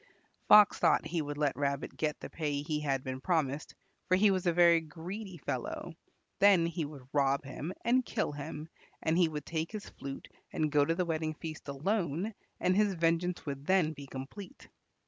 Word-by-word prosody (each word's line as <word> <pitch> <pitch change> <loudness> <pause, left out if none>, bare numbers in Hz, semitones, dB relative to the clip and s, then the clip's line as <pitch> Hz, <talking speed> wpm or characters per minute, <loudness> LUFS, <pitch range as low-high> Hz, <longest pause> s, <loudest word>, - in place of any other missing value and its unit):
Fox 210 -2 +8
thought - - +3
he 170 -1 -1
would 145 -1 -5
let 145 -2 +1
Rabbit 140 -1 -2
get 150 -1 -1
the - - -6
pay 145 -3 -2
he 150 -1 -1
had 135 -3 -1
been 130 0 -5
promised, 155 -5 -1 0.3
for 185 - +4
he 205 +1 +5
was 185 -2 0
a - - +5
very 170 -1 +5
greedy 175 +5 -7
fellow; 140 - -4 0.5
then 195 -4 +6
he 165 -1 -2
would 145 -3 -10
rob 140 -1 +2
him 140 +5 -5
and 255 +2 +4
kill 220 -9 -1
him, 150 +1 -6 0.4
and 160 - +2
he 170 -3 +4
would 150 -2 -5
take 160 0 -3
his 210 -1 -6
flute 135 0 -8 0.2
and 155 -1 0
go 145 0 +4
to 165 - +1
the 180 +1 0
wedding 160 -1 -2
feast 155 -1 -8
alone, 175 +6 -1 0.3
and 185 +1 +2
his 205 -1 +3
vengeance 170 +1 0
would 140 -1 -5
then 185 -5 +3
be 140 -1 -10
complete. 145 - -9
160 Hz, 190 wpm, -31 LUFS, 145-180 Hz, 0.5 s, Fox